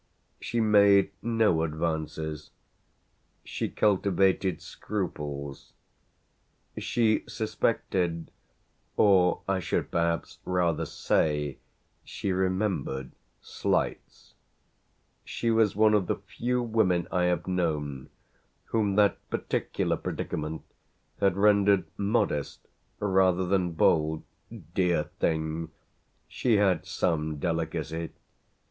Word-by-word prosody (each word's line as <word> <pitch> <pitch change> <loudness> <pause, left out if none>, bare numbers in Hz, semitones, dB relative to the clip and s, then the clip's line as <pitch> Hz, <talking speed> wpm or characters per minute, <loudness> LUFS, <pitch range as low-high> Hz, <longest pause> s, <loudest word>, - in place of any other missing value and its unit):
She 120 - -2
made 100 -2 +5
no 115 -8 +2
advances; 80 -1 -3 0.9
she - - -3
cultivated 95 -3 +2
scruples; 75 -7 -5 1.0
she 110 -2 +1
suspected, 95 -6 -1 0.7
or 95 -3 +4
I 95 -1 +1
should 90 - -2
perhaps 85 0 -1
rather 90 -3 0
say 75 -3 0 0.4
she 100 - -4
remembered 95 -8 -1 0.3
slights: - - -3 0.9
she 115 - -2
was 110 -2 +3
one 110 +1 +4
of 105 -4 +2
the - - +1
few 125 +1 -2
women 110 -7 +1
I 90 -1 +2
have 90 0 0
known 75 -7 -2 0.6
whom 105 -3 0
that 105 -1 +3
particular - - -1
predicament 75 +1 -4 0.6
had 100 -2 +2
rendered 100 -2 +4
modest 100 -8 -1 0.3
rather 95 -2 +2
than 90 -2 0
bold. 80 -1 +2 0.5
Dear 90 -4 +2 0.2
thing! 80 0 -1 0.6
she 120 -3 +1
had 95 -4 +2
some 80 -3 -1
delicacy. 80 0 -2
90 Hz, 90 wpm, -28 LUFS, 80-100 Hz, 1.0 s, made